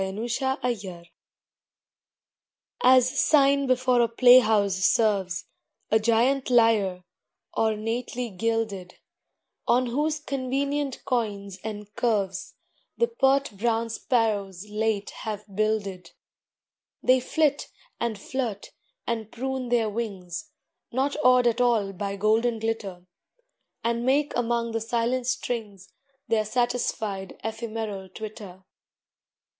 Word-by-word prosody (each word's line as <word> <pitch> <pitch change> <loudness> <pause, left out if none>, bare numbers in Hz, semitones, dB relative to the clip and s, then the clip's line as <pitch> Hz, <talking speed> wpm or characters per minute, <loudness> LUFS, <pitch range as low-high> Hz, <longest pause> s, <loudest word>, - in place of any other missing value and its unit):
A 190 - -3
NEST 230 +5 -3
IN 265 0 0
A 250 -1 +2
LYRE 185 -6 -9 1.8
As 255 0 +5
sign 280 -2 +4
before 255 -1 +3
a 235 - +3
playhouse 225 -5 +5
serves 190 -2 +1 0.5
A 220 - +5
giant 235 +5 +2
Lyre, 220 -7 +3 0.5
ornately 225 +2 -1
gilded, 200 -3 -2 0.7
On 250 +1 +3
whose 300 +5 -1
convenient 275 0 -2
coignes 200 -5 -2
and 210 -1 -7
curves 200 -6 -1 0.4
The 470 - +2
pert 275 - +2
brown 230 +2 0
sparrows 210 -6 -1
late 210 -1 -1
have 210 -2 -5
builded. 200 -4 -1 0.9
They 255 0 +5
flit, 290 +3 0 0.3
and 235 -3 -1
flirt, 225 -2 -4 0.3
and 225 -2 -3
prune 260 0 -3
their 235 -2 +2
wings, 200 - -5 0.4
Not 270 +3 0
awed 250 -1 +5
at 240 +1 +2
all 225 -5 +2
by 200 +1 -4
golden 220 +3 +2
glitter, 215 -5 -4 0.8
And 235 0 0
make 280 +3 +1
among 235 -1 0
the 225 0 -2
silent 240 +2 -1
strings 220 -6 -4 0.3
Their 220 -2 +1
satisfied 215 -4 -2
ephemeral 220 -3 -4
twitter. 200 -2 -9
225 Hz, 110 wpm, -26 LUFS, 205-250 Hz, 1.8 s, As